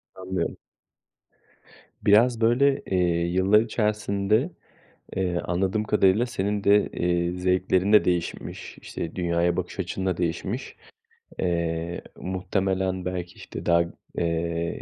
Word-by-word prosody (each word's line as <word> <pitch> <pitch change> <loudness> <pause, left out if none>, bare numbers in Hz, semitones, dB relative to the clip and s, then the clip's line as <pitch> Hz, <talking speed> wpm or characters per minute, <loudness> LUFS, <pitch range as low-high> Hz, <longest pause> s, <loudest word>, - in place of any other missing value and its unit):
Anlıyorum. 95 0 -3 1.5
Biraz, 115 +3 +5
böyle, 135 +5 +3
eee, 95 - -1 0.3
yıllar 95 +4 +4
içerisinde, 105 - 0 0.7
eee, 90 -2 0
anladığım 95 +4 0
kadarıyla 105 +1 +3
senin 105 -3 -2
de, 100 +1 +5
eee, 85 0 0
zevklerin 90 +2 +1
de 105 - +7
değişmiş, 90 -2 -3
işte, 80 - -6
dünyaya 85 0 +1
bakış 90 +2 -4
açın 95 +1 -3
da 90 -3 0
değişmiş. 90 +8 -3 0.6
Eee, 85 -1 -1
muhtemelen 95 0 -1
belki, 90 -1 -4
işte, - - -8
daha, 85 0 +4 0.3
eee, 85 0 -1
95 Hz, 110 wpm, -25 LUFS, 85-105 Hz, 1.5 s, de